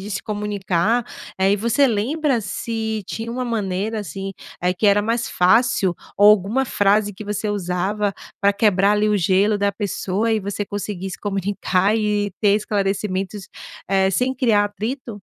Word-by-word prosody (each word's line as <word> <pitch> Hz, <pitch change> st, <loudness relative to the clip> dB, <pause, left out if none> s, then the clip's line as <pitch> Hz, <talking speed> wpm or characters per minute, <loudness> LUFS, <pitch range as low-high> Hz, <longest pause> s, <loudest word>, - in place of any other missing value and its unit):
de 200 Hz, +2 st, -7 dB
se 195 Hz, -, -3 dB
comunicar. 210 Hz, +1 st, 0 dB, 0.3 s
Eh, 190 Hz, +1 st, +3 dB
e 205 Hz, -, +2 dB
você 235 Hz, +6 st, +2 dB
lembra 260 Hz, +4 st, 0 dB
se 220 Hz, +1 st, -3 dB
tinha 225 Hz, +1 st, -5 dB
uma 250 Hz, +2 st, -3 dB
maneira 215 Hz, -1 st, -2 dB
assim, 195 Hz, +1 st, -6 dB, 0.3 s
eh 180 Hz, -, +2 dB
que 185 Hz, +4 st, 0 dB
era 205 Hz, 0 st, +4 dB
mais 230 Hz, +2 st, -1 dB
fácil 190 Hz, -1 st, +3 dB, 0.2 s
ou 205 Hz, +1 st, +7 dB
alguma 210 Hz, +6 st, +2 dB
frase 205 Hz, -2 st, +2 dB
que 190 Hz, -, -9 dB
você 210 Hz, 0 st, -3 dB
usava 200 Hz, +1 st, -1 dB, 0.3 s
pra 200 Hz, -, +4 dB
quebrar 200 Hz, -1 st, +3 dB
ali 210 Hz, 0 st, +2 dB
o 210 Hz, -, +3 dB
gelo 195 Hz, +3 st, +2 dB
da 200 Hz, 0 st, +2 dB
pessoa 200 Hz, +1 st, -2 dB
e 220 Hz, -, +1 dB
você 200 Hz, +1 st, -3 dB
conseguir 200 Hz, -2 st, -5 dB
se -, -, -7 dB
comunicar 195 Hz, 0 st, 0 dB
e 210 Hz, -2 st, 0 dB
ter 205 Hz, -2 st, +4 dB
esclarecimentos, 195 Hz, -1 st, -2 dB, 0.4 s
eh, 190 Hz, -1 st, +3 dB
sem 250 Hz, +7 st, 0 dB
criar 230 Hz, -5 st, +3 dB
atrito? 215 Hz, +2 st, -5 dB
205 Hz, 165 wpm, -21 LUFS, 195-220 Hz, 0.4 s, ou